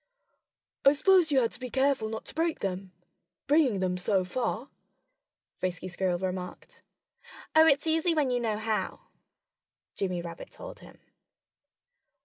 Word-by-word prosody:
"I 275 - +7
suppose 345 +2 +4
you 270 -2 +4
had 230 - +1
to - - -6
be 250 -1 -5
careful 265 -3 +1
not 220 0 -5
to - - -7
break 330 0 -1
them 190 0 -3 0.5
bringing 275 -9 +3
them 180 -1 0
so 190 0 +1
far," 240 +5 -2 0.9
Frisky 185 0 -3
Squirrel 180 0 -1
remarked. 185 0 -6 0.7
"Oh, 320 0 +8
it's 285 0 +4
easy 325 +1 +2
when 285 -4 +2
you 245 - +1
know 220 -3 -1
how," 220 0 -2 0.9
Jimmy 180 -3 -2
Rabbit 170 -1 -8
told - - -10
him. - - -15
225 Hz, 140 wpm, -29 LUFS, 185-290 Hz, 0.9 s, Oh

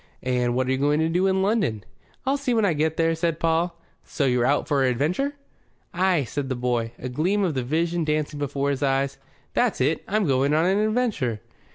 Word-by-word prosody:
"And 125 -1 0
what 130 0 0
are - - +1
you 130 - 0
going 145 +2 +2
to 160 - +1
do 180 +3 +2
in 190 0 +2
London?" 195 - 0 0.4
"I'll 270 +1 +2
see 270 -4 -1
when 220 -2 +3
I 185 - +2
get 155 +1 0
there," 165 0 +2
said 165 0 -1
Paul. 165 +1 0 0.2
"So 145 - -2
you're 125 -2 +2
out 145 - +1
for 140 -2 +2
adventure?" 155 - 0 0.6
"Ay," 180 -4 +2
said 135 +2 -4
the 130 - -1
boy, 120 -2 -1
a 125 - -6
gleam 175 +11 0
of 175 -5 0
the 130 - -1
Vision 165 +6 0
dancing 150 -1 -1
before 140 0 -1
his 135 - -3
eyes. 135 0 0 0.3
"That's 245 -3 +1
it. 145 +5 +1
I'm 210 0 +1
going 140 +1 +2
on 160 +2 +3
an 190 +3 +2
adventure." 215 - 0
155 Hz, 215 wpm, -24 LUFS, 130-180 Hz, 0.6 s, when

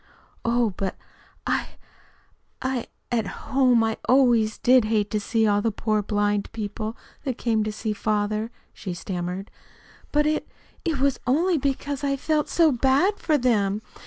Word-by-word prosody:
"Oh, 235 -2 +2
but 195 -2 -2 0.5
I - - 0 0.9
I 260 -2 -2 0.2
At 225 -4 +1 0.3
home 250 -4 +5
I 225 0 0
always 240 -4 +4
did 250 -2 +5
hate 210 -2 +1
to 215 - +1
see 220 +2 +1
all 205 -1 +3
the 225 - +1
poor 215 +1 0
blind 205 0 0
people 215 +1 -4 0.3
that 260 -3 -2
came 225 -3 +1
to 215 - -2
see 215 0 -3
father," 215 +1 -1 0.2
she 185 -3 -6
stammered. 180 +2 -4 0.6
"But 295 0 +3
it 305 0 0 0.4
it 325 -4 0
was 275 0 +2
only 325 +6 +3
because 280 +1 -2
I 275 -1 +1
felt 300 +2 0
so 330 -3 +4
bad 275 - +2
for 310 -2 +2
them. 215 -5 +1
230 Hz, 155 wpm, -25 LUFS, 210-270 Hz, 0.9 s, home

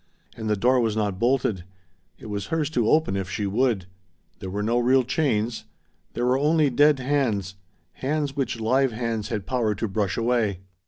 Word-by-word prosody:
And 110 -1 -4
the 105 - +2
door 125 +5 +3
was 115 -3 0
not 100 -3 -1
bolted. 120 -7 +1 0.5
It - - -14
was 100 -2 -4
hers 155 -2 -1
to 120 -6 +1
open, 155 -10 +2
if 95 -1 -3
she 100 +2 -2
would. 110 -1 +1 0.5
There 95 -4 -6
were 100 +2 -3
no 115 +3 +1
real 130 +2 +4
chains. 120 -4 -1 0.5
There 120 - -1
were 125 +2 +2
only 150 -1 +3
dead 145 +3 +4
hands, 125 -8 -1 0.4
hands 145 0 -2
which 135 -5 -2
live 130 +4 +2
hands 115 -2 -3
had 105 -4 -3
power 115 -5 0
to 110 +3 -2
brush 100 -1 -1
away. 115 -5 0
115 Hz, 180 wpm, -24 LUFS, 105-135 Hz, 0.5 s, real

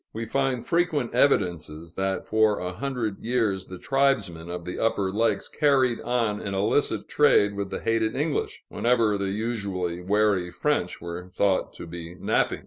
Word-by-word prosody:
We 115 +1 -4
find 135 0 -1
frequent 165 -7 0
evidences 85 - +1
that 95 0 -1
for 110 -1 +3
a 90 0 -4
hundred 120 -3 -3
years 110 -6 0
the 90 - -8
tribesmen 105 -10 0
of 90 -1 -5
the 90 - -5
Upper 100 -4 +1
Lakes 115 +4 +1
carried 135 -5 +2
on 115 -4 0
an 100 -1 -4
illicit 105 +9 +1
trade 105 -8 +4
with 100 -1 -3
the - - -5
hated 115 0 0
English, 150 +1 -2
whenever 115 -3 +2
the 100 -1 -1
usually 100 -5 -2
wary 100 -1 +2
French 145 - -1
were 85 +1 -6
thought 95 +1 +1
to - - -9
be 85 0 -8
napping. - - 0
105 Hz, 160 wpm, -26 LUFS, 90-125 Hz, -, trade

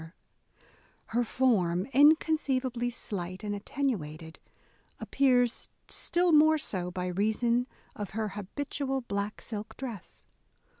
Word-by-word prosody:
Her 240 +2 +1
form, 195 -8 +1
inconceivably 270 -4 +3
slight 185 -6 -5
and 205 -1 -2
attenuated, 170 - -3 0.6
appears 250 -3 +2 0.2
still 350 0 +1
more 310 0 +6
so 185 -12 -2
by 180 0 -4
reason 220 +6 +1 0.3
of 205 -3 -5
her 215 -1 -1
habitual 270 +7 -3
black 205 -2 -4
silk 215 -1 -6
dress. 235 -8 -8
235 Hz, 100 wpm, -29 LUFS, 195-270 Hz, 0.6 s, more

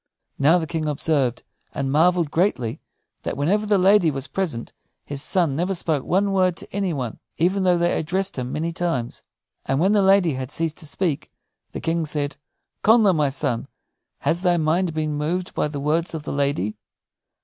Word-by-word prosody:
Now 150 +5 +5
the 165 - -1
King 160 -1 -3
observed, 140 -4 0 0.3
and 135 -1 -1
marveled 165 +1 +3
greatly, 155 - 0 0.4
that - - -4
whenever 200 +9 +1
the 205 -1 +4
lady 190 -2 +5
was 135 -2 -3
present 160 -12 -3 0.3
his 140 -1 -5
son 170 -4 +1
never 180 +5 0
spoke 160 -5 0
one 195 +3 +1
word 185 -3 +2
to - - -8
any 195 -3 0
one, 125 -7 -4 0.2
even 185 +4 +2
though 180 -2 +3
they 170 0 +1
addressed 185 +5 -1
him 125 -1 -4
many 165 +2 -2
times. 150 -9 -2 0.5
And 135 - +1
when 190 +5 +3
the 210 -1 +4
lady 190 -4 +4
had 130 -1 -4
ceased 160 +1 -2
to 160 - -9
speak, 160 -2 -2 0.4
the - - -6
King 165 -1 0
said: 145 -1 -2 0.5
"Connla, 220 -3 +6
my 150 -2 +2
son, 125 -3 -2 0.5
has 170 - 0
thy 180 -2 +3
mind 165 +2 +1
been 155 -1 -1
moved 165 +5 -2
by - - 0
the 145 -1 -5
words 160 +4 0
of 155 - -5
the - - -4
lady?" 140 -8 -1
160 Hz, 185 wpm, -23 LUFS, 145-185 Hz, 0.5 s, Connla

